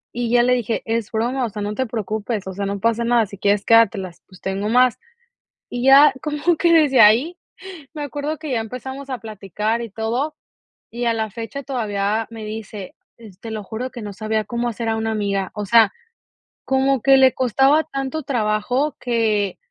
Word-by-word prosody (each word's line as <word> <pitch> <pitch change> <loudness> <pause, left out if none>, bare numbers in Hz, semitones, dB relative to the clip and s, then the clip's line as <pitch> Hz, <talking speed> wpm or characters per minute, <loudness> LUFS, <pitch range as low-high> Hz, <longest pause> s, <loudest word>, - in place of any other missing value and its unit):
Y 240 -1 -2
ya 240 0 +4
le 250 0 +3
dije: 235 -2 -1
es 225 -1 -2
broma, 245 +4 -1
o 235 - -1
sea, 210 0 -6
no 205 +1 -3
te 260 +3 -2
preocupes, 215 -1 -3
o 190 - -6
sea, 200 +1 -3
no 200 0 -3
pasa 230 +2 +1
nada, 235 -1 +3
si 200 -1 -12
quieres 205 0 +1
quédatelas, 200 -6 +3
pues, 185 -2 -17
tengo 195 +2 -2
más. 250 +1 +3 0.7
Y 245 0 -3
ya 275 +2 +8
como 300 +3 0
que 340 +1 +2
desde 300 -5 +4
ahí 240 +12 +5 0.6
me 295 - -4
acuerdo 290 +2 -4
que 310 -3 -6
ya 240 - +1
empezamos 265 +4 -7
a 255 - -3
platicar 215 +1 -3
y 230 - -6
todo, 235 +8 -2 0.5
y 240 +1 -4
a 230 - +2
la 220 -1 -2
fecha 230 +6 -6
todavía 220 -5 -2
me 225 -1 -8
dice: 215 -2 -7 0.2
"es 210 -5 -15
te 225 +2 -8
lo 215 -1 -5
juro 235 +6 -5
que 240 - -8
no 205 -1 -6
sabía 215 +1 -2
cómo 235 +3 -2
hacer 230 0 -3
a 225 - 0
una 225 0 -2
amiga". 200 -3 -2
O 210 -1 -5
sea, 230 +2 +5 0.7
como 265 -1 +1
que 270 +2 +5
le 265 -1 +5
costaba 270 +5 +3
tanto 275 +1 -4
trabajo 245 +3 -1
que 220 -5 0
230 Hz, 200 wpm, -21 LUFS, 210-260 Hz, 0.7 s, ya